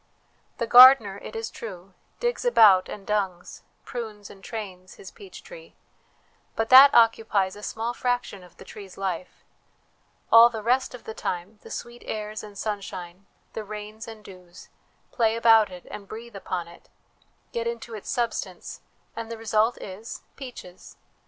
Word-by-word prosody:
The 235 Hz, -, -1 dB
gardener, 240 Hz, -5 st, +8 dB
it 215 Hz, -, -10 dB
is 225 Hz, 0 st, -4 dB
true, 190 Hz, -4 st, -10 dB
' -, -, -41 dB
digs 485 Hz, 0 st, -1 dB
about 215 Hz, -, +5 dB
and 200 Hz, -, -8 dB
dungs,' 195 Hz, -4 st, -3 dB, 0.2 s
prunes 215 Hz, -4 st, -7 dB
and 195 Hz, -, -16 dB
trains, 190 Hz, -5 st, -8 dB
his 405 Hz, -, -12 dB
peach 395 Hz, -3 st, -13 dB
tree; -, -, -13 dB, 0.8 s
but 225 Hz, 0 st, -1 dB
that 270 Hz, +2 st, +10 dB
occupies 220 Hz, -4 st, +3 dB
a 205 Hz, -, -11 dB
small 225 Hz, +3 st, -4 dB
fraction 245 Hz, -6 st, -2 dB
of 180 Hz, -, -18 dB
the -, -, -13 dB
tree's 195 Hz, -3 st, -12 dB
life: 185 Hz, -2 st, -5 dB, 0.9 s
all 230 Hz, +1 st, +9 dB
the 220 Hz, -2 st, -7 dB
rest 250 Hz, +2 st, +1 dB
of 245 Hz, -, -13 dB
the 220 Hz, -, -7 dB
time 185 Hz, +2 st, -5 dB
the -, -, -13 dB
sweet 240 Hz, 0 st, -8 dB
airs 215 Hz, 0 st, -5 dB
and 205 Hz, -1 st, -12 dB
sunshine, 195 Hz, -3 st, -6 dB, 0.3 s
the 220 Hz, -, -5 dB
rains 215 Hz, +2 st, -8 dB
and 220 Hz, -2 st, -11 dB
dews, 180 Hz, -2 st, -14 dB, 0.4 s
play 225 Hz, -2 st, +1 dB
about 225 Hz, -2 st, +5 dB
it 180 Hz, -1 st, -11 dB
and 200 Hz, -1 st, -9 dB
breathe 230 Hz, +1 st, -10 dB
upon 180 Hz, -3 st, -4 dB
it, 170 Hz, -, -17 dB, 0.6 s
get 235 Hz, 0 st, -3 dB
into 235 Hz, 0 st, -6 dB
its 215 Hz, -, -8 dB
substance, 225 Hz, -7 st, -4 dB, 0.3 s
and 230 Hz, 0 st, -6 dB
the 230 Hz, -, -5 dB
result 220 Hz, +1 st, +1 dB
is 205 Hz, +4 st, -9 dB
peaches. 245 Hz, -9 st, -11 dB
215 Hz, 160 wpm, -25 LUFS, 195-235 Hz, 0.9 s, that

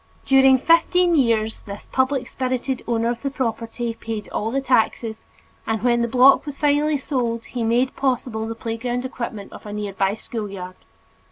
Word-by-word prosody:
During 270 Hz, -1 st, +6 dB
fifteen 335 Hz, +4 st, +3 dB
years 225 Hz, -5 st, +2 dB
this 200 Hz, 0 st, -10 dB
public 260 Hz, 0 st, +1 dB
spirited 255 Hz, 0 st, -2 dB
owner 230 Hz, 0 st, +1 dB
of 235 Hz, -, -5 dB
the 280 Hz, -, -1 dB
property 235 Hz, -2 st, -3 dB
paid 225 Hz, -2 st, -6 dB
all 220 Hz, -, -2 dB
the 270 Hz, +4 st, 0 dB
taxes, 230 Hz, -3 st, 0 dB, 0.4 s
and 225 Hz, -1 st, -1 dB
when 240 Hz, -1 st, +3 dB
the 235 Hz, -, +1 dB
block 255 Hz, +3 st, +6 dB
was 290 Hz, -2 st, -7 dB
finally 295 Hz, +1 st, +2 dB
sold 240 Hz, -4 st, -2 dB
he 245 Hz, -2 st, -4 dB
made 240 Hz, +3 st, +1 dB
possible 245 Hz, -4 st, -1 dB
the 225 Hz, -, -4 dB
playground 240 Hz, +2 st, -3 dB
equipment 235 Hz, -5 st, -6 dB
of -, -, -11 dB
a -, -, -6 dB
near 210 Hz, -1 st, -4 dB
by 195 Hz, +1 st, +1 dB
schoolyard. 200 Hz, -5 st, -6 dB
240 Hz, 170 wpm, -22 LUFS, 225-265 Hz, 0.4 s, During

